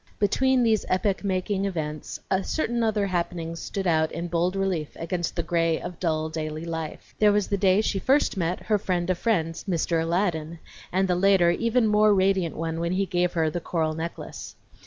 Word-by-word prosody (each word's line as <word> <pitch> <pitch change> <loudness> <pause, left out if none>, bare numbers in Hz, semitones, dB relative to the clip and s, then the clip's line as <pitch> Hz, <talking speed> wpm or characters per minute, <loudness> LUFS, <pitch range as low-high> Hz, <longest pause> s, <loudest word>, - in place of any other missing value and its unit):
Between 260 +5 +2
these 220 -3 +2
epoch 190 +2 0
making 195 +1 -1
events 155 -5 -4 0.2
certain 240 +1 -1
other 215 -3 +1
happenings 170 -2 -3
stood 195 -1 -4
out 160 -2 +2
in 170 +1 -4
bold 175 +2 0
relief 185 -6 -1
against 170 +1 -3
the - - -1
gray 165 -1 +1
of 180 - -7
dull 160 -3 0
daily 155 0 -4
life. 165 -2 -6
There 210 -1 +6
was 205 -1 +1
the 200 - +1
day 190 +1 +4
she 200 -2 -1
first 270 +5 +2
met 175 -1 -1
her 210 -1 +1
friend 175 -2 -1
of 175 - -2
friends, 165 -8 0
"Mr. 170 -3 0
Aladdin," 165 -2 -1 0.3
and 190 +1 +2
the 180 - +2
later, 180 -1 +4
even 230 +5 +1
more 210 -1 +4
radiant 190 -3 +1
one 165 0 -3
when 170 +1 -1
he 195 +1 +1
gave 180 -1 0
her 160 -2 +1
the 175 - -3
coral 160 -2 -1
necklace. 165 +2 -6
180 Hz, 190 wpm, -25 LUFS, 165-200 Hz, 0.3 s, There